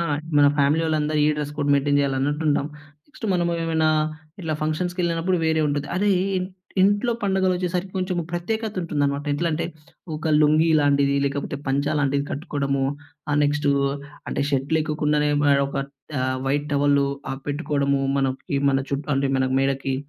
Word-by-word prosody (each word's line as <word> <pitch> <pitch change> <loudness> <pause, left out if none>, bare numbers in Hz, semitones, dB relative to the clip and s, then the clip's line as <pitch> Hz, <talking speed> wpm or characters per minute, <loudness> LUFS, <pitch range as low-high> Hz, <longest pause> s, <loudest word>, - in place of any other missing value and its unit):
ఆ! - - +1 0.4
మన 145 - +6
ఫ్యామిలీ 145 +4 +3
వాళ్ళందరూ 155 -1 0
ఈ - - +4
డ్రెస్ 150 0 -4
కోడ్ 145 0 +1
మెయింటైన్ 145 +1 +2
చేయాలి 135 -1 0
అన్నట్టు 145 +3 -1
ఉంటాం. 145 0 +1 0.4
నెక్స్ట్ 290 -6 -12
మనమేమైనా 165 -2 0 0.5
ఇట్ల 160 -2 -2
ఫంక్షన్స్‌కేళ్ళినప్పుడు 175 +2 0
వేరే 160 0 +2
ఉంటుంది. 145 0 -2
అరేయ్! 190 -2 +2 0.2
ఇన్ 185 0 -3 0.3
ఇంట్లో 205 +4 +3
పండుగలు 190 -1 +2
వచ్చేసరికి 180 +1 -2
కొంచము 185 -2 -1
ప్రత్యేకత 220 +5 -2
ఉంటుందనమాట. 145 -3 -1
ఎట్లంటే, 165 +1 -1 0.5
ఒక 160 +1 -3
లుంగీ 155 +2 +4
లాంటిది 140 -1 +3
లేకపోతే 140 0 -2
పంచ 140 +2 +1
లాంటిది 140 0 +1
కట్టుకోవడము. 140 -2 -2 0.5
ఆ - - +1
నెక్స్టు 145 0 +1 0.6
అంటే, - - -1
షర్ట్ 135 +1 -1
లేకొకుండానే 150 -1 +1
ఆహ్, - - +1
మే 140 -1 +5
ఒక 140 - -6 0.4
ఆహ్, 130 0 0
వైట్ 145 +2 0
టవలు 140 0 +3 0.2
ఆహ్, 135 0 -5
పెట్టుకోవడము, 140 -2 0 0.2
మనం 135 -1 +1 0.2
ఇవి 140 0 +1
మన 135 0 +1
చుట్టూ 140 +2 -3
అంటే 135 0 +1
మన 130 0 +1
మేడకి. 135 0 0
150 Hz, 160 wpm, -23 LUFS, 140-170 Hz, 0.6 s, మన